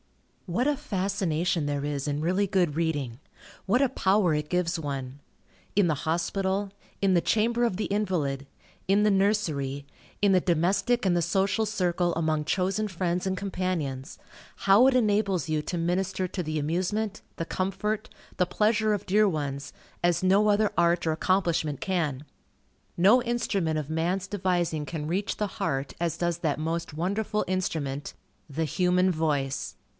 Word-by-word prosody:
What 210 +10 0
a 295 - +2
fascination 185 - -1
there 145 0 -2
is 145 -1 -2
in 145 0 -1
really 185 +5 +1
good 180 -6 +1
reading! 145 -7 -1 0.5
What 245 +7 +3
a - - +4
power 195 -7 +2
it 150 0 -2
gives 180 0 0
one! 135 -3 -5 0.6
In 200 -4 +5
the 160 - +2
hospital, 190 +4 -1 0.3
in 195 -1 +3
the 175 - +4
chamber 235 +5 +1
of 230 -6 +1
the 215 - -1
invalid, 165 -10 -1 0.4
in 200 +2 +3
the 210 - +4
nursery, 160 -9 0 0.4
in 200 -1 +4
the 185 - +4
domestic 190 +8 +1
and 180 -2 +3
the 175 - +2
social 190 +5 +1
circle, 180 -4 0
among 155 -2 0
chosen 195 +6 0
friends 180 0 -1
and 190 0 -1
companions, 180 -9 -3 0.4
how 200 +6 +5
it 270 - +4
enables 205 - +2
you 155 -1 0
to 175 - -4
minister 185 +2 0
to 180 0 -4
the 155 -1 -2
amusement, 185 +7 -1 0.2
the 165 - -2
comfort, 210 +4 -2 0.3
the 180 -1 +2
pleasure 215 +2 +2
of 205 -1 -3
dear 210 +2 +4
ones, 140 -4 -3 0.3
as 175 -1 +2
no 200 +3 +4
other 210 0 +3
art 170 0 +3
or 160 - +2
accomplishment 165 -4 0
can. 155 -7 -1 0.7
No 205 +8 +6
instrument 200 -9 -1
of 150 -1 -6
man's 175 +4 -1
devising 175 -6 -1
can 150 0 -4
reach 190 +5 -1
the 210 - 0
heart, 135 0 -1
as 170 -2 0
does 170 -1 -1
that 155 -4 -1
most 165 0 -3
wonderful 200 +6 -1
instrument, 150 -7 -2 0.4
the 160 +3 -1
human 180 +3 +2
voice. 145 -5 -1
180 Hz, 160 wpm, -27 LUFS, 155-200 Hz, 0.7 s, No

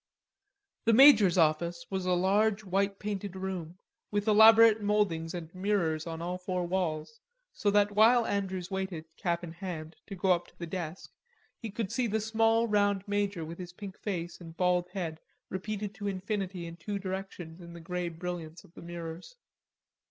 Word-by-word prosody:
The 230 - +4
major's 220 -8 +8
office 170 +1 +2
was 190 -1 -2
a 180 - +3
large 200 +4 +2
white 195 +1 0
painted 200 -2 -4
room, 185 -3 -5 0.3
with 205 +1 -1
elaborate 220 +1 +7
mouldings 195 -6 0
and 165 -2 -7
mirrors 185 -5 0
in 165 0 -5
all 180 +1 -3
four 180 -1 -2
walls, 175 +2 -2 0.3
so 205 - 0
that 205 0 +3
while 225 +3 +5
Andrews 190 -3 -2
waited, 190 -4 -3
cap 170 -1 -1
in 170 - -6
hand, 165 -3 -6
to 200 - -6
go 190 0 +1
up 175 -1 +1
to - - -22
the 170 - -5
desk, 170 0 -6 0.5
he 225 - -5
could 210 -1 -4
see 250 -2 0
the 220 0 0
small 225 +1 +2
round 205 -2 +1
major 200 -4 -1
with 165 +3 -8
his 175 -1 -7
pink 195 0 -8
face 175 -4 -5
and 165 -1 -11
bald 180 -1 +2
head 170 -4 -4 0.3
repeated 205 +2 -4
to 205 0 -5
infinity 195 -2 -3
in 170 0 -8
two 200 +4 -4
directions 185 -3 -6
in 170 0 -10
the 170 - -9
grey 175 +1 -3
brilliance 170 -1 -6
of 165 - -20
the - - -12
mirrors. 170 - -8
185 Hz, 175 wpm, -30 LUFS, 170-205 Hz, 0.5 s, major's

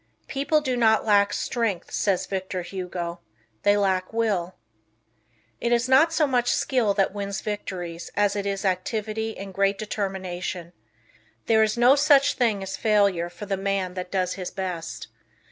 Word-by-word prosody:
"People 295 +2 +1
do 260 -3 -1
not 220 -2 +3
lack 205 -1 +4
strength," 225 -8 -2
says 195 -3 0
Victor 190 -1 -4
Hugo; 175 -2 -5 0.4
"they 205 0 +4
lack 190 -2 0
Will." 205 -6 -1 1.0
It 235 - -1
is 240 +1 +2
not 270 +6 +5
so 320 -1 +2
much 245 -3 +1
skill 235 -7 +1
that 195 -1 +1
wins 200 -1 -4
victories 180 -5 -5
as 205 -1 +2
it 200 -1 -2
is 195 0 -2
activity 215 +4 -2
and 195 0 -8
great 195 +1 +1
determination 185 -4 -4 0.7
There 220 -1 +4
is 215 +1 +2
no 245 +3 +6
such 285 -1 +5
thing 220 -5 +1
as 190 - -4
failure 200 -5 +2
for 205 - -9
the 195 -1 -2
man 195 -1 -1
that 180 -1 -5
does 185 -2 0
his 185 -2 -5
best. 170 - -5
200 Hz, 160 wpm, -25 LUFS, 185-225 Hz, 1.0 s, no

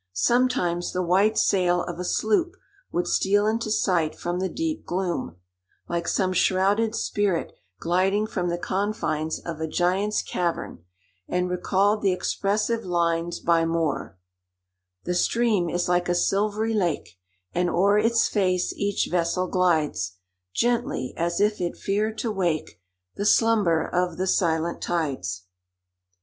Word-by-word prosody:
Sometimes 180 - +1
the 185 - 0
white 195 +5 +3
sail 180 -2 +2
of 175 -1 -6
a - - -2
sloop 220 - +1 0.4
would 175 - 0
steal 205 +2 +2
into 220 +1 0
sight 175 -7 +1
from 175 +1 -3
the 190 0 -1
deep 320 - -3
gloom, 175 - -3 0.5
like 170 0 -2
some 185 -1 +1
shrouded 200 +5 +2
spirit 200 -5 -1 0.3
gliding 190 +5 +1
from 180 -4 -2
the 170 - -1
confines 175 -5 -2
of 165 -2 -6
a 160 - -1
giant's 185 +6 0
cavern, 170 - -3 0.4
and 180 0 -1
recalled 200 +3 +1
the 195 - +3
expressive 210 +5 -1
lines 170 -1 0
by 165 -1 +2
Moore:— 165 - -1 0.9
"The 180 - -2
stream 210 -1 +1
is 175 +1 -1
like 175 0 +1
a 175 - +2
silvery 210 +4 +1
lake, 170 - -2 0.3
And 175 0 +1
o'er 200 +4 +3
its 230 +1 +3
face 185 -3 0
each 200 0 0
vessel 175 +1 +1
glides 155 - +1 0.4
Gently, 235 - 0
as 170 +1 -1
if 210 -1 +1
it 175 - -2
feared 215 +2 -1
to 230 - -2
wake 170 - -2 0.4
The 205 - -2
slumber 210 -9 +3
of 180 -1 -1
the 185 - -1
silent 170 -3 0
tides." 135 - -2
180 Hz, 140 wpm, -25 LUFS, 170-205 Hz, 0.9 s, white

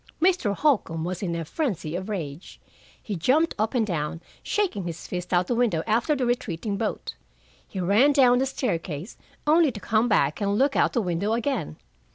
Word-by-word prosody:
Mr. 340 - +2
Holcombe 205 - +1
was 180 +1 -4
in 175 -4 -2
a 165 -1 -3
frenzy 185 - -2
of 190 +3 -4
rage. 165 -5 -6 0.4
He 210 - -5
jumped 280 - +2
up 220 +4 0
and 230 -3 +3
down, 165 -4 -3 0.2
shaking 355 - -1
his 170 -1 -6
fist 180 0 -5
out 180 0 +3
the 245 - -1
window 230 -9 +1
after 235 +7 +2
the 260 -3 -1
retreating 215 -5 -2
boat. - - -3 0.5
He 190 - -6
ran 205 +11 +4
down 250 -3 +5
the 265 - +1
staircase, 175 - -3 0.3
only 310 -1 +4
to 215 - -8
come 220 +4 +1
back 150 -8 +2
and 200 0 +1
look 275 +3 +2
out - - +3
the 235 - +1
window 185 +4 -1
again. 235 - -2
210 Hz, 190 wpm, -25 LUFS, 175-255 Hz, 0.5 s, down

